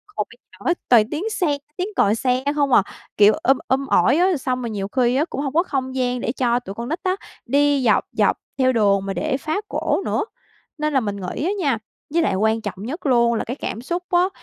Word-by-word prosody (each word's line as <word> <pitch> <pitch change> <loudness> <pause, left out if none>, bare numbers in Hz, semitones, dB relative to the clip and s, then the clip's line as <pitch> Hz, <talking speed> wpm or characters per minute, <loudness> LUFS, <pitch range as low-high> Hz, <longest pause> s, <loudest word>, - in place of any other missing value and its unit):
còn - - -1
bây - - -16
giờ - - -19
á 350 - +4 0.2
toàn 225 -3 +5
tiếng 345 +9 -2
xe, 350 -9 0 0.2
tiếng 365 +2 -1
còi 205 +2 +3
xe 255 +2 0
không 280 -3 +1
à, 195 - +6 0.3
kiểu, 210 +1 +7
um 270 +1 +2
um 270 +1 +1
ỏi 290 - +4
á, 360 -1 +3
xong 255 -1 -2
rồi 235 - -3
nhiều 200 -2 -3
khi 245 +2 +1
á, 290 +4 +2
cũng 280 - -5
hông 275 -2 -3
có 335 +3 +3
không 260 -5 -3
gian 250 -1 0
để 235 - -1
cho 245 -2 +1
tụi 200 -5 -9
con 235 +3 -5
nít 325 +4 -2
á, 370 0 +1 0.3
đi 285 +1 +2
dọc 215 - +3
dọc - - +2 0.2
theo 260 -1 +3
đường 200 -3 +2
mà 195 - -2
để 280 +3 -1
phá 310 +8 -2
cổ 405 - -1
nữa. 420 - 0 0.5
Nên 300 -1 -1
là 265 - +4
mình 205 -4 -3
nghĩ 185 +8 -4
á 375 - +1
nha 280 -8 +1 0.4
với 335 - +3
lại 190 - +1
quan 220 +3 +1
trọng 205 - -5
nhất 300 +8 -6
luôn 235 -3 +4
là 225 - -1
cái 250 - -5
cảm 230 - -5
xúc 345 +7 -3
á, 355 0 +3
260 Hz, 250 wpm, -21 LUFS, 230-305 Hz, 0.5 s, kiểu